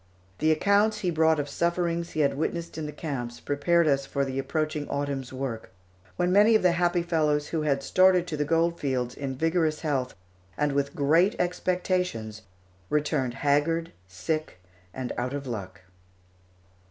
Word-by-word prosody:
The 155 - +3
accounts 200 +6 +2
he 180 - 0
brought 160 -1 +3
of 145 - -2
sufferings 170 +2 -1
he 155 - 0
had 140 - +2
witnessed 165 +4 -3
in 155 -1 -4
the - - -5
camps 135 -6 -5
prepared 170 +4 +2
us 140 -2 +2
for 140 0 -1
the 135 0 -3
approaching 155 +2 -2
autumn's 140 -2 -3
work, 130 -4 -5 0.5
when 180 - +1
many 210 +4 +6
of 215 - +3
the 180 - +5
happy 175 0 +1
fellows 150 -3 +1
who 160 - -1
had 140 -2 0
started 185 +2 +4
to 170 -3 -4
the 150 - 0
gold 165 +3 +1
fields 125 -3 -1
in 135 -2 -5
vigorous 160 +1 0
health 135 -5 -1 0.4
and 150 -1 +1
with 140 0 -1
great 165 +8 +3
expectations 180 - -1 0.5
returned 145 -5 0
haggard, 165 +4 +2 0.2
sick, 95 - -4 0.3
and 130 +2 -5
out 125 +3 -2
of 140 -1 -5
luck. 100 -6 -6
150 Hz, 165 wpm, -27 LUFS, 135-170 Hz, 0.5 s, many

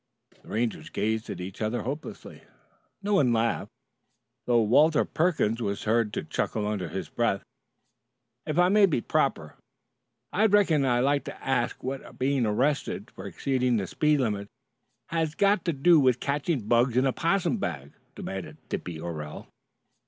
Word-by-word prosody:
The - - -21
Rangers 115 +1 -2
gazed 110 +1 -2
at 90 - -5
each 95 +3 -7
other 110 +3 -1
hopelessly. 145 +6 -7 0.6
No 205 +1 0
one 140 -11 +4
laughed, 115 0 0 0.8
though 120 -2 +4
Walter 150 +8 +4
Perkins 150 - 0
was 100 -3 -2
heard 110 -1 +1
to - - -2
chuckle 105 -2 -2
under 105 -4 -2
his - - -4
breath. - - 0 1.0
"If 155 - -2
it 175 +1 +5
might 205 -1 +6
be 145 - 0
proper, - - -1 0.8
I 215 +4 +4
reckon 185 -9 +3
I'd 120 -1 +2
like 140 +2 +2
to - - -9
ask 130 -3 -1
what 135 +1 -6
being 130 -2 +1
arrested 130 +8 -1
for - - -9
exceeding 125 -3 0
the 100 - -1
speed 150 - +1
limit 105 -4 -1 0.6
has 160 -2 -1
got 200 -2 +2
to 170 - +2
do 160 +3 +5
with 130 -3 +3
catching 140 -4 -1
bugs 120 +1 +3
in 130 - +4
a 135 - +2
'possum 180 +3 +1
bag?" 70 - -4 0.2
demanded 95 -1 -6
Dippy 85 -2 -4
Orell. 75 -3 -6
125 Hz, 160 wpm, -27 LUFS, 110-155 Hz, 1.0 s, might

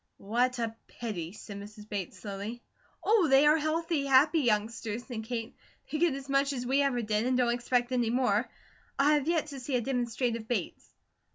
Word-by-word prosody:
"What 245 +5 0
a 225 -1 -2
pity!" 180 -8 -5
said 205 0 -9
Mrs. 210 +1 -11
Bates, 200 -4 -4
slowly. 205 +4 -6 0.4
"Oh, 415 -5 +4
they 270 +2 +6
are 300 +2 +6
healthy, 310 -1 0
happy 285 +5 +5
youngsters," 225 -1 -1
said 225 -4 -6
Kate. 230 -1 -4 0.4
"They 305 - -1
get 335 -4 +3
as 275 0 -7
much 275 +1 +2
as 250 -2 -4
we 270 +3 +2
ever 260 -4 +1
did, 215 +2 0
and 255 0 +2
don't 240 -2 +3
expect 245 0 0
any 245 -3 +1
more. 240 -2 +1 0.5
I 285 +2 +4
have 295 -1 +1
yet 335 -2 +2
to 275 - -6
see 255 +1 -3
a 245 - +2
demonstrative 240 -2 -1
Bates." 220 -8 -3
245 Hz, 190 wpm, -30 LUFS, 220-275 Hz, 0.5 s, they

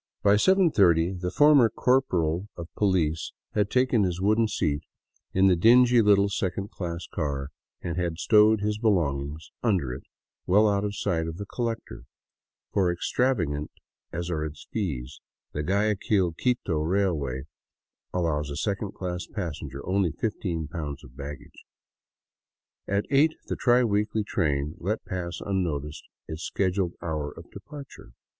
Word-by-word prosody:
By 100 - +5
7:30 100 - +4
the 90 - -1
former 145 -1 +6
corporal 95 -9 +1
of 85 -1 -7
pohce 85 -6 0 0.2
had 105 -1 +1
taken 125 -2 +3
his 90 -2 0
wooden 110 +4 +3
seat 75 -8 -1 0.5
in 95 +1 +3
the 95 -2 +5
dingy 120 +6 +6
little 100 -1 +5
second 100 -1 -2
class 85 -2 -5
car, 70 -3 -3 0.3
and 85 -1 -3
had 85 -2 -1
stowed 105 +2 +5
his 105 0 -1
belongings 75 - 0
under 90 - +1
it 65 - -7 0.5
well 105 +4 +5
out 100 -1 +1
of 105 0 -2
sight 85 -5 -1
of 80 0 -5
the 100 - -5
collector; 115 +1 -4 0.7
for 95 -3 +3
extravagant 85 - 0 0.4
as 85 +1 -4
are 75 -2 -1
its 75 -1 -7
fares, 75 - -3 0.3
the 75 - -3
Guayaquil 100 0 +1
Quito 100 -5 0
Railway 80 -7 0 0.7
allows 75 -5 -1
a 70 - -5
second 100 +2 -2
class 90 -1 -4
passenger 75 - -6
only 95 -3 +1
fifteen 90 -7 -3
pounds 75 -2 -6
of 60 - -15
baggage. 70 +1 -9 1.2
At 100 +1 0
eight 150 +3 +4
the - - -3
tri 125 0 +4
weekly 105 0 0
train 75 -6 -1
let 105 +5 -2
pass 90 -2 -4
unnoticed 80 -7 -2 0.2
its 80 +1 -6
scheduled 95 -1 -1
hour 75 -3 -3
of 85 - -12
departure. 130 - -11
90 Hz, 140 wpm, -26 LUFS, 80-105 Hz, 1.2 s, former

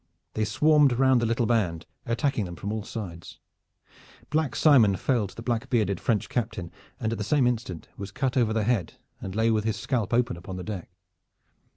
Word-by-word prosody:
They 110 - 0
swarmed 150 +5 +4
round 130 0 +4
the 115 - +1
little 115 +1 +1
band, 95 -8 0 0.2
attacking 115 -1 0
them 85 -1 -7
from 100 +6 -5
all 110 0 -2
sides. 95 -6 -7 0.9
Black 155 -2 0
Simon 120 -11 +5
felled 110 -1 0
the 115 - -8
black 120 +2 -2
bearded 105 -7 +1
French 110 -4 0
Captain, 110 -8 -3 0.3
and 110 - -1
at 115 - -3
the - - -1
same 135 +4 +2
instant 110 -9 -2
was 100 0 -6
cut 130 +6 -2
over 120 -4 +2
the 110 -1 +1
head 105 -6 0 0.3
and 95 - -6
lay 110 +1 +3
with 110 -1 +1
his 110 -1 0
scalp 115 -1 -1
open 120 -4 +1
upon 90 +2 -8
the 90 - -5
deck. 100 -4 -6
110 Hz, 195 wpm, -26 LUFS, 100-125 Hz, 0.9 s, Simon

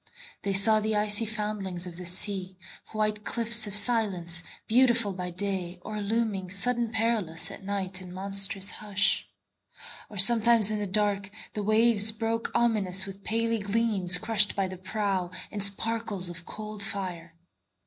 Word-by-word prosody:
They 200 - -2
saw 215 +3 +5
the 215 0 -2
icy 210 +1 +1
foundlings 210 -4 -4
of 175 -2 -10
the 180 -1 -3
sea, 185 0 0 0.3
White 215 -1 -2
cliffs 230 -1 +3
of 205 - +2
silence, 200 -6 +1 0.2
beautiful 235 -3 +2
by 180 -1 -6
day, 185 -1 -5
Or 215 -1 -6
looming, 205 -3 -3
sudden 235 +4 -2
perilous, 220 -7 -2
at - - -11
nightIn 190 -2 -5
monstrous 195 +1 +3
hush; 205 -1 +1 0.8
or 210 - -11
sometimes 225 +1 +7
in 215 - -3
the 205 - -4
darkThe 205 +1 -3
waves 215 0 +4
broke 225 +1 -3
ominous 205 -6 +1
with 195 0 -11
paly 230 +1 -1
gleamsCrushed 205 0 +2
by 195 -1 -1
the 185 0 -9
prow 190 -1 -3 0.2
in 210 - -6
sparkles 205 -1 -1
of 170 -1 -11
cold 215 -1 -8
fire. 180 -5 -5
205 Hz, 140 wpm, -26 LUFS, 190-220 Hz, 0.8 s, sometimes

